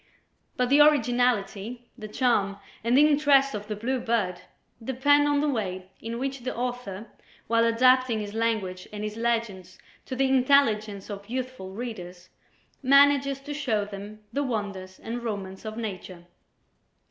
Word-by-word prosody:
But 250 -1 +1
the 290 +1 +7
originality, 245 -4 +2
the 215 -4 -8
charm 210 -4 +1 0.3
and 235 +3 +3
the 300 +2 +7
interest 285 -2 +4
of 210 0 -5
"The 210 - -3
Blue 250 +5 -2
Bird" 225 -7 -1 0.4
depend 285 +4 +3
on 290 0 +2
the 300 - +1
way 190 -8 -3
in 230 +1 -5
which 270 +2 -3
the 255 +1 -5
author, 240 -5 -4 0.4
while 230 +1 +2
adapting 250 0 +4
his 205 -1 -6
language 215 -5 -2
and 210 0 -6
his 210 0 -4
legends 225 -6 -2 0.3
to 260 - -4
the 270 +1 +2
intelligence 225 -7 +2
of 200 +1 -8
youthful 255 -6 -5
readers, 185 -6 -7 0.5
manages 275 0 +4
to 290 +1 -6
show 245 -8 -1
them 205 +1 -9
the 285 - 0
wonders 200 -7 -4
and 235 +2 -5
romance 200 -4 -5
of 215 0 -6
Nature. 185 -5 -6
230 Hz, 150 wpm, -26 LUFS, 205-260 Hz, 0.5 s, the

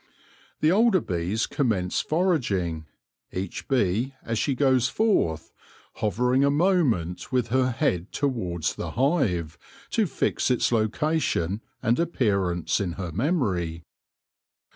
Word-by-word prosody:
The 155 - +4
older 215 0 +4
bees 90 - -1
commence 100 -10 0
foraging, 105 - 0 0.4
each 95 0 -5
bee 125 +1 +1
as 115 -1 -2
she 140 - 0
goes 130 -2 +3
forth 85 - +1 0.5
hovering 125 +6 +1
a 140 - +4
moment 140 - +1
with 125 -3 0
her 130 +1 +2
head 115 - -1
towards 95 - -1
the - - -6
hive, 95 - +1 0.3
to 220 -4 +2
fix 140 - 0
its 125 -1 +2
location 115 - 0 0.2
and 115 +5 +2
appear 105 - +1
ance 85 -2 -1
in 95 -4 -2
her 90 -2 -5
memory. 95 - -1
115 Hz, 120 wpm, -25 LUFS, 90-145 Hz, 0.5 s, The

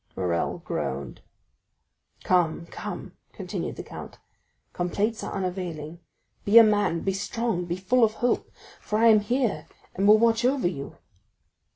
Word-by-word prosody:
Morrel 85 -3 -1
groaned. 70 +2 -4 1.0
"Come, 170 -2 +1
come," - - -7 0.2
continued - - -5
the - - -7
count, - - -10 0.6
"complaints 205 +5 -1
are - - -5
unavailing, 175 -4 -4 0.4
be 205 +3 +5
a 230 - +11
man, 205 -6 +2
be 195 - -1
strong, 200 -1 -2
be 175 0 -2
full 230 +7 +2
of 215 -1 +3
hope, 245 +2 -1 0.3
for 210 - -2
I 230 +1 +5
am 215 -1 +7
here 210 - -1 0.3
and 195 +2 +1
will 210 +1 +8
watch 230 +1 +2
over 260 -5 +2
you." 140 -6 -6
195 Hz, 145 wpm, -26 LUFS, 170-225 Hz, 1.0 s, a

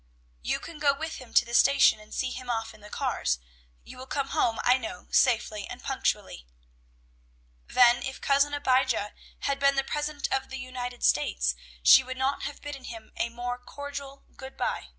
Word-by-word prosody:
"You - - -1
can 330 -2 -10
go 285 -1 +3
with 320 +3 -5
him 255 -3 -12
to - - +6
the 235 - -9
station, 275 -3 +5
and 215 0 -16
see 260 -1 -2
him 255 -1 -7
off 225 -1 -2
in 215 - -17
the 210 - -12
cars. - - -1 0.5
You - - -12
will 260 - -9
come 275 0 -2
home, 235 -7 +1
I 250 +1 +4
know, 220 -6 -7
safely 220 -4 +2
and 245 0 -9
punctually." 205 - -2 1.2
Then, 240 -1 +5
if 265 +1 -5
Cousin 280 +1 +3
Abijah 260 -6 +1 0.3
had 280 0 -1
been 275 0 +4
the 270 - +1
President 295 +1 -2
of 265 0 -1
the 270 - -5
United 250 -1 -6
States 60 - +2 0.3
she - - +8
would 260 0 -6
not 265 +2 0
have 290 - -6
bidden 280 -3 -7
him 225 -2 -9
a 235 - -1
more 245 +1 -4
cordial 280 +1 -8
"good 265 0 -10
by." - - -2
255 Hz, 190 wpm, -28 LUFS, 235-275 Hz, 1.2 s, she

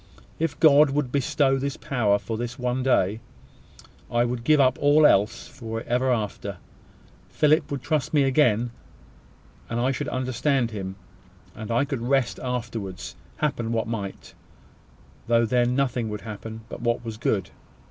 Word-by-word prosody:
If 160 -3 -2
God 150 -1 +7
would 135 -2 -1
bestow 135 0 +2
this 140 +1 -3
power 110 -6 +1
for 105 +2 -5
this 120 +1 -4
one 125 +1 -1
day, 110 -5 +2 0.9
I 120 0 +2
would 120 -1 -3
give 150 +4 +4
up 130 -2 +3
all 145 +2 +5
else 105 -4 +3
for 115 -1 -6
it - - -8
for - - -9
ever 130 +1 +2
after. 105 -4 -3 0.7
Philip 155 +1 +2
would 140 -3 -4
trust 145 0 -1
me 145 -3 +4
again 125 -4 +2 1.0
then, 115 - -2
and - - 0
I 130 +2 +2
should 145 +2 -3
understand 130 -1 0
him; 95 -3 -5 0.6
and 110 -1 -8
I 120 +4 +2
could 135 -4 -4
rest 130 0 +1
afterwards, 115 -6 -4 0.2
happen 130 -6 -1
what 115 -1 -1
might 105 -4 -5 0.9
though 115 0 +4
then 125 +1 +2
nothing 125 -4 0
would 105 -1 -5
happen 110 +1 -7
but - - -8
what 120 0 -1
was 110 -1 -5
good. 100 -5 -1
120 Hz, 165 wpm, -25 LUFS, 115-135 Hz, 1.0 s, God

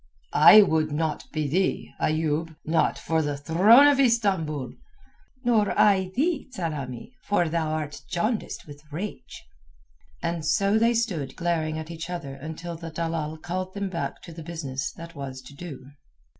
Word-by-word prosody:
"I 215 - +9
would 160 -4 +1
not 155 +1 -2
be 155 -2 -1
thee, 180 +7 0
Ayoub—not 160 +1 0
for 160 -1 0
the 145 -2 -2
throne 190 - +6
of 290 -2 +5
Istambul." 190 - +1 0.7
"Nor 220 -4 +2
I 190 -3 +4
thee, 300 +1 0
Tsamanni; 150 - -5 0.2
for 200 -4 +2
thou 160 0 -1
art 150 -3 -4
jaundiced 215 +5 -2
with 145 -1 -12
rage." 190 +8 -6 0.8
And 170 -1 -2
so 200 +7 +2
they 230 +1 +3
stood 175 - -1
glaring 160 -2 -1
each 160 +1 -6
at 175 -1 -3
the 140 - -7
other - - -7
until 160 +5 -7
the 165 0 -7
dalal 160 -1 -3
called 185 +4 -4
them 200 -1 -2
back 170 -2 -4
to 170 - -10
the 165 - -9
business 145 -5 -4
that 165 0 -10
was 135 -2 -6
to 130 - -13
do. 140 -4 -9
165 Hz, 155 wpm, -26 LUFS, 155-190 Hz, 0.8 s, I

